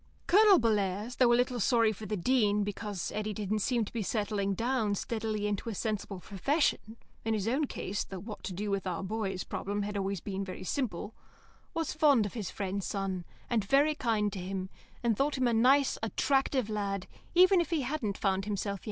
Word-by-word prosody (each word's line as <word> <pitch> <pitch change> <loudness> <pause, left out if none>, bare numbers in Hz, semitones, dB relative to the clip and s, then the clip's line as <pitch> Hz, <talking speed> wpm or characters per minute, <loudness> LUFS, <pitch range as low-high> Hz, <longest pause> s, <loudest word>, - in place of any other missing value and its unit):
Colonel 405 +1 +7
Bellairs, 210 0 0
though 245 -2 +5
a - - +6
little 245 0 +1
sorry 230 0 +3
for 215 0 -7
the 210 - -2
Dean 210 0 +2
because 205 -2 -4
Eddy 215 0 -2
didn't 210 +1 -1
seem 235 +1 +1
to - - -11
be 230 - -1
settling 205 -1 -1
down 225 -2 0
steadily 215 0 -2
into 210 +2 -2
a 220 - -4
sensible 205 -2 -3
profession 225 - 0 0.3
(in 225 0 0
his 210 0 -2
own 270 +6 +2
case 205 -3 -3
the 190 - -8
"What 210 +2 -8
to 190 - -4
do 205 +3 -3
with 195 -1 -1
our 180 +1 -2
boys" 195 -2 -2
problem 205 +1 -3
had 205 +1 -4
always 195 -1 -1
been 195 +2 -4
very 185 -1 -7
simple) 215 -2 -2 0.6
was 330 -2 -1
fond 290 -8 +4
of 205 - -5
his 210 -6 -4
friend's 195 0 -3
son, 190 -3 -3 0.2
and 230 -4 +1
very 280 +8 +4
kind 220 -8 0
to 195 - -4
him, 185 +1 -4 0.3
and 235 -2 +2
thought 280 +5 0
him 255 -1 +2
a 235 - +2
nice, 265 +5 +4
attractive 265 +2 +1
lad, 200 -3 -2 0.3
even 370 +1 +7
if 340 - -3
he 330 -4 +1
hadn't 250 -6 -2
yet - - -13
found 195 -1 +1
himself. 200 -1 -2
215 Hz, 205 wpm, -31 LUFS, 195-245 Hz, 0.6 s, Colonel